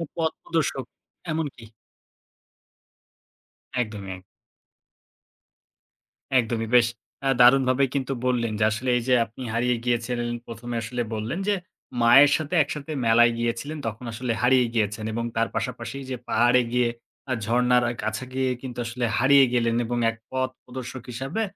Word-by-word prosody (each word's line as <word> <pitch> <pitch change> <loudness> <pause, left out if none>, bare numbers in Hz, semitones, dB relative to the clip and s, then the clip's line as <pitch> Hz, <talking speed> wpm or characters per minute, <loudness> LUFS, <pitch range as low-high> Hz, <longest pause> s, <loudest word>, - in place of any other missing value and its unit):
পথপ্রদর্শক 160 -4 -1 0.5
এমনকি? 150 -6 -3 2.2
একদমই, 105 -5 -4
এক 90 - -17 2.2
একদমই। 115 -1 -1
বেশ 120 -2 +6 0.4
আ - - +3
দারুণভাবে 130 +1 +5
কিন্তু 135 -1 -1
বললেন 120 -3 +1
যে, - - +3
আসলে 120 +4 -2
এই - - -1
যে 130 - +4
আপনি 115 +3 -10
হারিয়ে 120 +2 +1
গিয়েছিলেন। 120 0 -1 0.2
প্রথমে 120 +1 -6
আসলে 120 +2 -3
বললেন 110 - -3
যে 205 - +3 0.5
মায়ের 135 +5 +7
সাথে 155 +2 -3
একসাথে 150 +1 -6
মেলায় 120 +1 +5
গিয়েছিলেন, 120 +6 -2
তখন 115 +3 -6
আসলে 120 +2 -3
হারিয়ে 125 0 +4
গিয়েছেন 110 -1 -1
এবং 115 +1 -2
তার 115 0 +2
পাশাপাশি 115 +3 -4
যে 130 - -2
পাহাড়ে 120 +2 +4
গিয়ে, 125 -1 +2 0.4
আ - - +3
ঝর্ণার 125 +2 +3
আ - - -1
কাছে 110 +3 -3
গিয়ে 130 0 0
কিন্তু 125 -2 -7
আসলে 120 +1 -2
হারিয়ে 135 +2 +6
গেলেন, 115 -1 +2
এবং 120 +1 -2
এক 115 - -4 0.2
পথপ্রদর্শক 130 -1 -5
হিসেবে 135 - -3
125 Hz, 135 wpm, -25 LUFS, 115-130 Hz, 2.2 s, মায়ের